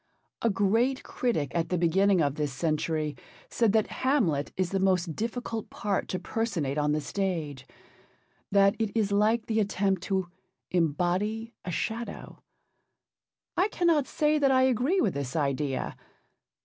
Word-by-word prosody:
A 230 Hz, -, +3 dB
great 225 Hz, +7 st, +1 dB
critic 160 Hz, -, -1 dB
at 170 Hz, -1 st, -1 dB
the 180 Hz, -, 0 dB
beginning 185 Hz, +2 st, +3 dB
of 140 Hz, -1 st, +1 dB
this 150 Hz, -1 st, -2 dB
century 155 Hz, +1 st, -1 dB, 0.4 s
said 230 Hz, -3 st, +2 dB
that 220 Hz, -1 st, +3 dB, 0.2 s
Hamlet 205 Hz, -, +1 dB
is 185 Hz, -2 st, 0 dB
the 195 Hz, -, 0 dB
most 185 Hz, -4 st, +1 dB
difficult 230 Hz, -1 st, -4 dB
part 205 Hz, -2 st, -2 dB
to 185 Hz, -, -2 dB
personate 175 Hz, -, -2 dB
on 150 Hz, 0 st, +1 dB
the 150 Hz, -, +1 dB
stage, 150 Hz, -6 st, -3 dB, 0.8 s
that 200 Hz, 0 st, +5 dB
it 220 Hz, -2 st, +1 dB
is 205 Hz, -2 st, +1 dB
like 215 Hz, +3 st, +2 dB
the 220 Hz, -1 st, 0 dB
attempt 195 Hz, -2 st, +1 dB
to 190 Hz, -2 st, -1 dB, 0.4 s
'embody 185 Hz, +7 st, 0 dB
a -, -, -5 dB
shadow.' 230 Hz, +6 st, -4 dB, 1.1 s
I 370 Hz, -, +3 dB
cannot 335 Hz, -8 st, +2 dB
say 300 Hz, 0 st, +1 dB
that 280 Hz, -2 st, +4 dB
I 260 Hz, -1 st, +4 dB
agree 260 Hz, -, +2 dB
with 205 Hz, -, +1 dB
this 140 Hz, -2 st, -4 dB
idea. 140 Hz, -2 st, -1 dB
195 Hz, 150 wpm, -28 LUFS, 160-225 Hz, 1.1 s, that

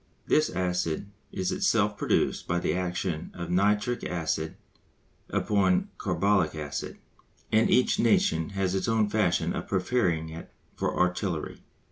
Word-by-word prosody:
This 155 Hz, 0 st, +3 dB
acid 90 Hz, 0 st, -2 dB, 0.2 s
is 95 Hz, -1 st, -2 dB
itself -, -, +2 dB
produced -, -, 0 dB
by 85 Hz, -, +1 dB
the 85 Hz, -, 0 dB
action 90 Hz, -2 st, -2 dB
of 85 Hz, -1 st, -5 dB
nitric 105 Hz, +6 st, +1 dB
acid 80 Hz, -2 st, -2 dB, 0.7 s
upon 95 Hz, -3 st, +2 dB
carbolic 100 Hz, -6 st, +1 dB
acid, 75 Hz, -2 st, -5 dB, 0.5 s
and -, -, +4 dB
each -, -, +3 dB
nation 80 Hz, +1 st, +2 dB
has 95 Hz, -1 st, +1 dB
its 95 Hz, -, -1 dB
own 110 Hz, -2 st, +2 dB
fashion 105 Hz, -5 st, +1 dB
of -, -, -4 dB
preparing 90 Hz, -5 st, 0 dB
it 80 Hz, +1 st, -9 dB, 0.2 s
for -, -, -2 dB
artillery. 90 Hz, -2 st, -1 dB
90 Hz, 130 wpm, -28 LUFS, 85-100 Hz, 0.7 s, and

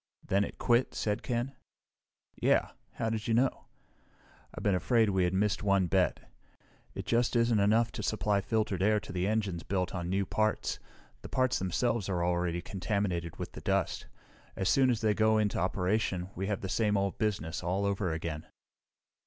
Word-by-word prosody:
"Then 100 Hz, +1 st, +2 dB
it -, -, -6 dB
quit," 120 Hz, +1 st, +2 dB
said 105 Hz, 0 st, -1 dB
Ken. 125 Hz, +2 st, -2 dB, 0.8 s
"Yeah -, -, +2 dB, 0.2 s
how 115 Hz, -, -2 dB
did 110 Hz, -1 st, -3 dB
you 115 Hz, -, +2 dB
know?" 130 Hz, +3 st, +1 dB, 0.9 s
"I've -, -, -8 dB
been 100 Hz, -, +3 dB
afraid 110 Hz, +5 st, +3 dB
we 95 Hz, -2 st, +2 dB
had 90 Hz, -, 0 dB
missed 105 Hz, +1 st, +1 dB
one 100 Hz, -2 st, +3 dB
bet. 95 Hz, +1 st, +1 dB, 0.7 s
It -, -, -5 dB
just 120 Hz, +1 st, +1 dB
isn't 115 Hz, -2 st, +3 dB
enough 110 Hz, +3 st, +3 dB
to -, -, -5 dB
supply 105 Hz, -1 st, 0 dB
filtered 105 Hz, -3 st, -1 dB
air 105 Hz, +2 st, +3 dB
to -, -, -10 dB
the 90 Hz, +1 st, 0 dB
engines 100 Hz, -5 st, -1 dB
built 90 Hz, -1 st, -2 dB
of 85 Hz, -2 st, -3 dB
new 95 Hz, +2 st, 0 dB
parts. 110 Hz, +2 st, 0 dB, 0.4 s
The -, -, -9 dB
parts 130 Hz, -1 st, +1 dB
themselves 100 Hz, +3 st, 0 dB
are 90 Hz, -2 st, 0 dB
already 85 Hz, 0 st, 0 dB
contaminated 90 Hz, -4 st, -2 dB
with -, -, -5 dB
the -, -, -9 dB
dust. -, -, -1 dB, 0.5 s
As 95 Hz, -, -1 dB
soon 135 Hz, -1 st, +4 dB
as 120 Hz, -3 st, 0 dB
they 110 Hz, -2 st, +3 dB
go 110 Hz, +1 st, +3 dB
into 105 Hz, -2 st, +1 dB
operation, 95 Hz, 0 st, 0 dB
we 95 Hz, +2 st, -3 dB
have 105 Hz, -2 st, -2 dB
the 95 Hz, -, -3 dB
same 105 Hz, +1 st, +1 dB
old 100 Hz, -1 st, -1 dB
business, 90 Hz, -6 st, -1 dB
all 90 Hz, +3 st, -1 dB
over 100 Hz, -3 st, 0 dB
again. 80 Hz, -1 st, -4 dB
100 Hz, 180 wpm, -30 LUFS, 90-110 Hz, 0.9 s, soon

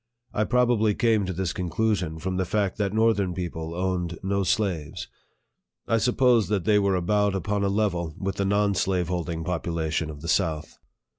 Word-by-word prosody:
I 105 Hz, -, +1 dB
probably 120 Hz, -4 st, +2 dB
came 110 Hz, -4 st, +2 dB
to -, -, -2 dB
this 90 Hz, -1 st, -2 dB
conclusion 90 Hz, -2 st, -1 dB
from 90 Hz, +3 st, -3 dB
the 95 Hz, -, +1 dB
fact 100 Hz, +1 st, -1 dB
that 100 Hz, -2 st, 0 dB
northern 110 Hz, -4 st, +2 dB
people 85 Hz, -2 st, -4 dB
owned 90 Hz, -2 st, -2 dB
no 100 Hz, +1 st, 0 dB
slaves. 95 Hz, -5 st, -1 dB, 0.8 s
I 115 Hz, -, +2 dB
supposed 125 Hz, -2 st, +3 dB
that 100 Hz, -4 st, 0 dB
they 105 Hz, -1 st, +4 dB
were 100 Hz, -1 st, +2 dB
about 100 Hz, +3 st, +1 dB
upon 100 Hz, +2 st, -1 dB
a 100 Hz, -, +2 dB
level 90 Hz, -6 st, -1 dB
with 95 Hz, 0 st, -3 dB
the 100 Hz, -, 0 dB
non 100 Hz, +1 st, +2 dB
slave 90 Hz, -2 st, 0 dB
holding 85 Hz, -2 st, -2 dB
population 80 Hz, -2 st, -2 dB
of 75 Hz, -2 st, -8 dB
the 85 Hz, -, -7 dB
south. 80 Hz, -4 st, -1 dB
95 Hz, 175 wpm, -25 LUFS, 85-105 Hz, 0.8 s, they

